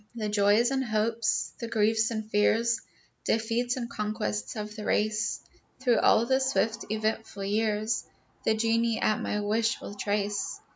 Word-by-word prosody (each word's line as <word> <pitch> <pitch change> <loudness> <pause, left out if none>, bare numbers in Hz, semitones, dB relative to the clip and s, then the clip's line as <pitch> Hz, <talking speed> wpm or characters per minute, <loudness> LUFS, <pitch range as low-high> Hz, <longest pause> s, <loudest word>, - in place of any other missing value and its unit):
The 215 -2 -2
joys 210 +4 +3
and 265 -1 +1
hopes, 225 0 0
the 235 - -4
griefs 220 0 +2
and 220 -2 -4
fears, 225 +2 +2 0.4
Defeats 235 +3 0
and 240 -2 -3
conquests 110 - -3
of 210 0 -5
the 215 - -6
race, 215 +1 0 0.4
Through 250 -3 +3
all 230 - +4
the 265 +2 +2
swift, 245 -4 0
eventful 220 -1 -2
years, 215 +2 0 0.4
The 220 - +2
geni 230 +1 +1
at 215 - +1
my 210 - -1
wish 220 +2 +1
will - - -8
trace. 205 0 -2
220 Hz, 150 wpm, -28 LUFS, 210-230 Hz, 0.4 s, all